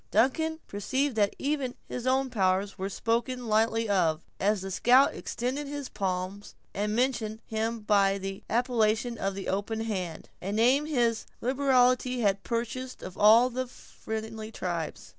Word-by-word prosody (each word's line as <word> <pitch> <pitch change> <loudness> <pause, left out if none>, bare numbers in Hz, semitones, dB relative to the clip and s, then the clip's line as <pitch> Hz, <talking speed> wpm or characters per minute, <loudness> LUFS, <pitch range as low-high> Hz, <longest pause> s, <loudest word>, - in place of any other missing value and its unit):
Duncan 320 +6 +2
perceived 260 +7 -1
that 205 -1 +2
even 275 -3 -1
his 250 0 -4
own 265 0 +2
powers 195 -2 +1
were 195 0 -3
spoken 235 +4 -1
lightly 225 +1 +2
of, 170 -5 +1 0.2
as 205 0 +1
the 195 0 -5
scout 250 +8 +5
extended 260 +5 -3
his 285 -2 -5
palm, 190 0 -2 0.3
and 210 +1 -1
mentioned 230 -3 0
him 225 +1 -2
by 200 -2 +3
the 195 0 -5
appellation 235 -1 +1
of 195 0 -1
the 195 - -5
"Open 205 +3 -2
Hand"—a 190 -3 -5
name 250 +8 +3
his 240 -6 +1
liberality 255 -1 +2
had 200 -2 +2
purchased 240 +3 -4
of 185 - -7
all 225 +4 +6
the 255 +1 -2
friendly 220 -2 -7
tribes. 170 -6 -4
225 Hz, 145 wpm, -28 LUFS, 200-255 Hz, 0.3 s, all